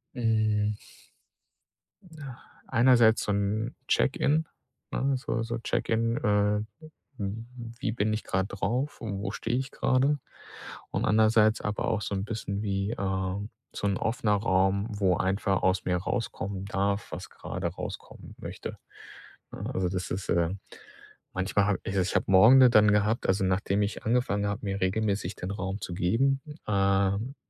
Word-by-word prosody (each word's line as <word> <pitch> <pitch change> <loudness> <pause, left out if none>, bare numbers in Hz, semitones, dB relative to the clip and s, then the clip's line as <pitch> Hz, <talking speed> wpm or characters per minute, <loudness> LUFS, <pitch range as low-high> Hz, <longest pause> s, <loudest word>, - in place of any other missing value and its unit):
Hm. 110 -3 +1 1.3
Na, 155 -8 -10 0.3
einerseits 120 -2 +5
so - - -1
'n 105 +4 -1
Check-in, 150 +3 +2 0.5
ne, 135 +1 0
so 115 -3 -2
so 115 +1 -3
Check-in, 115 0 0
äh, 105 0 +2 0.6
w 100 -4 -2 0.5
wie 125 - -1
bin 110 -1 0
ich 110 - -2
grade 95 +1 -1
drauf 120 +9 -2
und 100 -4 -4
wo 105 - -3
stehe 115 +1 -2
ich 130 0 -3
grade? 135 +3 +2 0.7
Und - - -1
andererseits 110 0 +4
aber 105 0 -2
auch 110 -2 0
so 105 - -3
'n 95 +1 -2
bisschen 105 -3 -4
wie, 100 0 -1
äh, 95 -1 -2 0.3
so 100 - -2
'n 100 -1 +1
offener 110 -2 0
Raum, 100 0 +1
wo 100 -5 +1
einfach 95 0 0
aus 95 +1 +2
mir 90 -1 +1
rauskommen 95 0 -3
darf, 100 +1 -1
was - - -7
grade - - -5
rauskommen - - -8
möchte, - - -7 0.7
ne? - - -6
Also, 95 -1 0
das 90 0 -3
ist, 90 +2 -4
äh 85 -1 +2 0.8
manchmal 95 +2 +1
habe 100 -3 +1
ich 100 - -4
ich 95 - +3
ich 90 - -2
habe - - +2
Morgende 125 +7 +8
dann 105 -3 +5
gehabt, 105 +2 +1
also 95 +1 +2
nachdem 95 +2 +1
ich 100 - -4
angefangen 110 -3 +1
habe, 100 0 -3
mir 100 0 -2
regelmäßig 100 0 0
den 90 - -5
Raum 100 0 -4
zu 90 - -5
geben, 115 +11 +2 0.3
ähm, 100 +4 +1
105 Hz, 155 wpm, -28 LUFS, 95-115 Hz, 1.3 s, Morgende